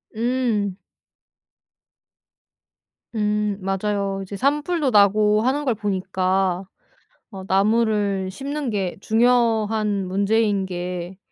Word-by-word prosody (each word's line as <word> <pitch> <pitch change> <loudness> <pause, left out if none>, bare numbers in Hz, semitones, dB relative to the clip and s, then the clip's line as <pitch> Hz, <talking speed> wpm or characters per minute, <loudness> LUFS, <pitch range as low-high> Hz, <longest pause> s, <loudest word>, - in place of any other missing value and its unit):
음. 230 -4 0 2.4
음 210 -1 0
맞아요. 195 0 -2
이제 195 +1 -8
산불도 295 - 0
나고 210 0 +4
하는 270 +5 0
걸 250 -4 +1
보니까 190 -2 -1 0.7
어 190 -2 -8
나무를 205 -1 +1
심는 280 +4 -4
게 195 -5 -2
중요한 220 -4 +2
문제인 200 +1 +1
게 180 0 -5
210 Hz, 170 characters per minute, -22 LUFS, 195-225 Hz, 2.4 s, 나고